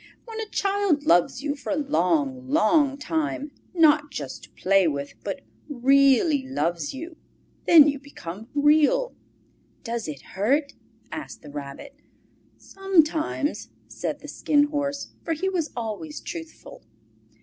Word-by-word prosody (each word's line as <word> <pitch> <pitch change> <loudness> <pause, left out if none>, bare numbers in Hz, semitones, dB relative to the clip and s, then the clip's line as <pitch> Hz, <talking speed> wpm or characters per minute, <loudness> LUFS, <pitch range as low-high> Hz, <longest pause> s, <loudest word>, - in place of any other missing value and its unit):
When 450 -2 -7
a 440 -2 -4
child 395 -8 +1
loves 175 +8 +3
you 290 -1 -1
for 285 - -6
a - - +1
long, 160 - 0
long 275 - +3
time, 300 -1 -2 0.2
not 305 -3 +4
just 140 - -7
to - - -23
play 195 -1 +3
with, 140 -2 -3
but - - -4 0.3
REALLY 275 +1 +4
loves 170 - -1
you, 320 +4 -8 0.5
then 310 -4 +9
you 285 -2 0
become 220 -7 -9
Real." 305 +13 +3 0.7
"Does 230 - -3
it 145 -3 -7
hurt?" 275 +10 +1 0.4
asked 310 - -7
the 150 - -10
Rabbit. 140 -1 -8 0.6
"Sometimes," 325 -5 0 0.2
said - - -4
the - - -10
Skin 290 -1 +2
Horse, 285 -1 -3
for 330 - -1
he 370 +5 -1
was 345 -5 -1
always 235 +7 -5
truthful. 330 -2 -9
285 Hz, 135 wpm, -25 LUFS, 210-315 Hz, 0.7 s, then